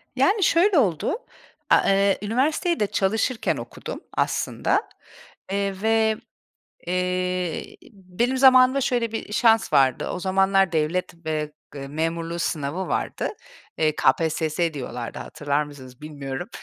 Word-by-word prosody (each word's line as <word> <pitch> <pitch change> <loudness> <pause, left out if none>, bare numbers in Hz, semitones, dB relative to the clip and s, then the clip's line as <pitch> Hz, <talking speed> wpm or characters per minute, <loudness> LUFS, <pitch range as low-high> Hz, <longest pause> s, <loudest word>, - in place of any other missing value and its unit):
Yani 400 +1 +3
şöyle 360 +3 +4
oldu, 205 - +1 0.5
a - - +6
eee, 195 0 +3
üniversiteyi 290 - 0
de 210 - +2
çalışırken 220 +5 0
okudum - - -7
aslında, - - 0 0.6
eee, 195 -1 -2
ve, 220 0 +2 0.7
eee, 180 -1 -2 0.2
benim 205 +7 -2
zamanımda 260 0 +6
şöyle 240 -3 0
bir 225 -2 -5
şans 225 0 +3
vardı. 130 -2 +3
O - - -4
zamanlar 195 0 +2
devlet, 165 +3 -1
eee, 155 -1 -2 0.4
memurluğu 165 +3 -2
sınavı 165 +2 -2
vardı. - - -2 0.5
Eee, 155 -1 +1
KPSS 160 0 +1
diyorlardı 125 -3 -6
hatırlar 145 0 -2
mısınız 130 -4 -13
bilmiyorum. 140 -3 -6
185 Hz, 115 wpm, -24 LUFS, 155-225 Hz, 0.7 s, a